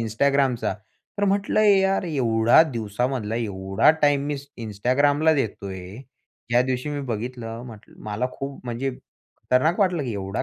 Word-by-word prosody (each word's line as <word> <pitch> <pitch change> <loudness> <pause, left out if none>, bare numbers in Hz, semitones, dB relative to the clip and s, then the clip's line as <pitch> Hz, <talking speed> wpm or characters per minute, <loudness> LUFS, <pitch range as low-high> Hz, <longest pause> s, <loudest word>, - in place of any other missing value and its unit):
Instagramचा 130 +2 +1 0.4
तर 205 - +2
म्हटलं 200 +1 +1
यार 195 -2 +3
एवढा 120 -3 +4
दिवसामधला 115 +1 -2
एवढा 95 +2 +2
टाईम 145 -1 +3
मी 145 -1 -2 0.3
Instagramला 140 +9 +2
देतोय. 100 -7 -4 0.5
ज्या 120 +1 +4
दिवशी 130 +2 -2
मी 145 -1 -3
बघितलं 115 +1 -5
म्हटलं 110 -4 -13
मला 105 +4 -2
खूप 135 0 -7
म्हणजे 125 +3 -2
खतरनाक 130 +6 -2
वाटलं, 180 -5 +2
की 120 - -3
एवढा 100 0 -3
125 Hz, 130 wpm, -24 LUFS, 110-145 Hz, 0.5 s, एवढा